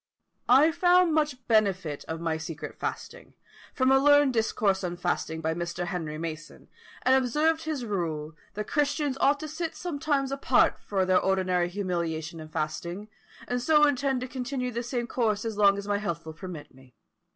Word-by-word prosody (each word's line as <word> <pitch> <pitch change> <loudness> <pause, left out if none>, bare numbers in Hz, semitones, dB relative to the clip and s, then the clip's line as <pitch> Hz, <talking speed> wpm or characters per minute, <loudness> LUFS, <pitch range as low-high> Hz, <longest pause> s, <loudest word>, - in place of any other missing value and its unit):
"I 280 +6 +6
found 355 0 +4
much 295 -5 0
benefit 195 -9 +1
of 160 0 -4
my 165 -1 -1
secret 160 0 -7
fasting, - - -6 0.4
from 260 0 +2
a 270 - +6
learned 290 -1 +5
discourse 210 -4 +1
on 175 -1 -3
fasting 175 -2 -2
by 160 0 0
Mr. 175 +1 -3
Henry 160 -4 -4
Mason, 155 -1 -7 0.3
and 260 - +4
observed 305 +5 +1
his 300 -6 -3
rule, 160 -7 -3 0.2
that 210 +1 -3
Christians 290 0 0
ought 285 +1 +4
to 310 - -4
sit 325 +1 -4
sometimes 285 -5 -1
apart 275 0 +2
for 195 -2 -1
their 185 0 +4
ordinary 185 -2 +1
humiliation 170 -4 -3
and 155 0 -10
fasting, 170 +6 -4 0.4
and 245 0 -1
so 300 +3 +5
intend 270 -2 +1
to 255 - -4
continue 250 0 -3
the 235 0 -3
same 240 0 -3
course 225 -4 -1
as 225 -2 -3
long 200 -1 +4
as 200 0 -6
my 205 0 0
health 170 -6 -4
will 160 - -7
permit 165 -3 -9
me. 130 -2 -20
210 Hz, 175 wpm, -27 LUFS, 170-275 Hz, 0.4 s, I